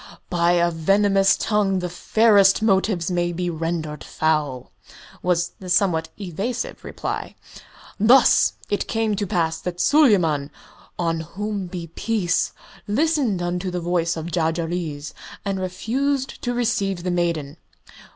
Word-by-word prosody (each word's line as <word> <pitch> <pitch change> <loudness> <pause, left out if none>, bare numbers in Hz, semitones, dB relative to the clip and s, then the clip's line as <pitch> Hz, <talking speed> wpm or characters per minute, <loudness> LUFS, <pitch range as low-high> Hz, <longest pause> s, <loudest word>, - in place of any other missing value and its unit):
"By 175 0 +3
a 175 0 +2
venomous 195 +4 +3
tongue 205 -3 +1
the 180 -1 -2
fairest 200 +2 +4
motives 190 -4 +1
may 175 -1 0
be 175 +1 -2
rendered 160 -2 -3
foul," 150 -5 -1 0.5
was 175 -1 +1
the 185 - -8
somewhat 175 -3 +2
evasive 200 +6 -4
reply. - - -5 0.6
"Thus 240 +5 +5
it 205 - -1
came 225 -2 0
to 205 0 -2
pass 165 -5 0
that 175 -1 -5
Suleyman 180 - +3 0.5
on 165 -1 0
whom 195 +4 -4
be 175 -1 -6
peace! 180 +2 -1 0.4
listened 255 - +1
unto 180 +1 -2
the 180 0 -3
voice 170 -1 0
of 160 +2 -5
Jarjarees 165 -2 -2 0.3
and 195 -1 -1
refused 255 +9 -2
to 245 - -1
receive 200 -7 0
the 180 - -1
maiden. 170 -4 -1
180 Hz, 130 wpm, -22 LUFS, 170-205 Hz, 0.6 s, Thus